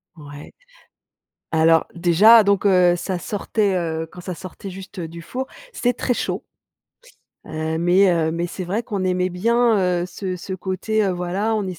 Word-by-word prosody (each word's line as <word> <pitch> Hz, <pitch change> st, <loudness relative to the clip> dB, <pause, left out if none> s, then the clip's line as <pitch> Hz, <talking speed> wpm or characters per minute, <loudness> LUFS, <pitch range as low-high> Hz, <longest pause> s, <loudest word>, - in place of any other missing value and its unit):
Ouais. 145 Hz, -1 st, -11 dB, 1.0 s
Alors 160 Hz, 0 st, +4 dB
déjà, 195 Hz, +7 st, +6 dB
donc 200 Hz, 0 st, +2 dB
heu, 180 Hz, -2 st, +5 dB
ça 180 Hz, 0 st, -3 dB
sortait, 205 Hz, 0 st, -1 dB
heu, 160 Hz, -2 st, -2 dB
quand 180 Hz, -, -11 dB
ça 180 Hz, 0 st, -5 dB
sortait 190 Hz, +3 st, -9 dB
juste 190 Hz, 0 st, -9 dB
du 165 Hz, +1 st, -7 dB
four, 260 Hz, +10 st, -5 dB, 0.3 s
c'est 245 Hz, -, +1 dB
très 245 Hz, +1 st, -1 dB
chaud. -, -, -3 dB, 1.0 s
Heu, 160 Hz, +1 st, -3 dB
mais 180 Hz, +3 st, +4 dB
heu, 160 Hz, -2 st, +1 dB
mais 170 Hz, +1 st, -2 dB
c'est 180 Hz, +1 st, -6 dB
vrai 210 Hz, +6 st, -2 dB
qu'on 200 Hz, -4 st, -3 dB
aimait 185 Hz, 0 st, 0 dB
bien, 230 Hz, +5 st, +2 dB, 0.3 s
heu, -, -, -3 dB
ce 185 Hz, +1 st, -5 dB
ce 190 Hz, +2 st, -7 dB
côté, 195 Hz, +4 st, -1 dB
heu, 195 Hz, -, +1 dB
voilà, 185 Hz, +5 st, -1 dB
on 210 Hz, -2 st, -1 dB
185 Hz, 170 wpm, -21 LUFS, 170-205 Hz, 1.0 s, déjà